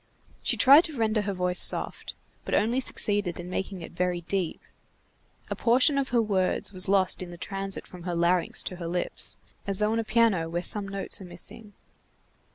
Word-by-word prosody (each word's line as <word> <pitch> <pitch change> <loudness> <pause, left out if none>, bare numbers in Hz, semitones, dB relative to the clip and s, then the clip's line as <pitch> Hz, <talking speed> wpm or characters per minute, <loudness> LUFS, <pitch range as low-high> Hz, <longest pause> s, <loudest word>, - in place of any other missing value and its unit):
She - - +1
tried 280 +5 +7
to 310 -5 -6
render 220 -1 0
her 200 0 -3
voice 180 -1 +1
soft, - - +2 0.3
but - - -2
only 235 +4 +1
succeeded 205 -8 0
in 175 +1 -8
making 190 -1 -5
it - - -10
very 180 0 -2
deep. 180 -1 -3 0.9
A - - -1
portion 260 +4 +3
of 275 - -2
her 235 -2 +2
words 195 -1 0
was 185 0 +2
lost 195 -2 +2
in 180 - -7
the 175 - -10
transit 195 +2 -5
from 180 - -12
her 175 0 -4
larynx 170 +1 +1
to 185 - -6
her 170 -2 -6
lips, 175 +1 0 0.3
as 195 -1 -1
though 210 +1 0
on 225 - 0
a - - -1
piano 215 -7 +1
where 175 +1 -3
some 205 0 +4
notes 195 0 -1
are - - -9
missing. 190 +4 -7
195 Hz, 195 wpm, -26 LUFS, 180-215 Hz, 0.9 s, tried